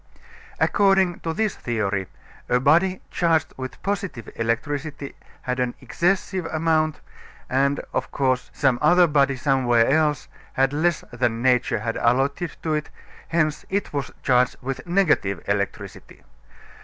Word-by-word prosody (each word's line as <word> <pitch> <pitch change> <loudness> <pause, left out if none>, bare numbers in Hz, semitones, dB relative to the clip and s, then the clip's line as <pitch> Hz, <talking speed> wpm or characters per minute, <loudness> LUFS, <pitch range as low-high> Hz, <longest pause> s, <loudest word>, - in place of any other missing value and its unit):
According 195 -3 +3
to 165 - -3
this 215 +4 -1
theory, 100 -5 -2 0.4
a 125 - +3
body 170 +8 +3
charged 165 -2 +1
with 130 0 -7
positive 200 - -3
electricity 140 +5 -3 0.3
had 125 0 -2
an 125 -1 -1
excessive 180 +5 -1
amount, 155 -1 0 0.5
and, 140 +2 +1
of - - -2
course, 130 -2 0
some 130 -4 +1
other 175 +4 +6
body 140 -3 +2
somewhere 125 -3 +2
else 150 0 +1 0.3
had 135 +1 +2
less 165 +2 +1
than 120 -1 -1
nature 125 -4 +2
had 115 0 -2
allotted 135 +7 0
to 160 - 0
it; 150 0 -2 0.4
hence 155 -2 0
it 200 -3 -2
was 140 -3 -2
charged 125 -1 +3
with 135 +5 -5
negative 160 - +2
electricity. - - -4
140 Hz, 130 wpm, -23 LUFS, 125-165 Hz, 0.5 s, other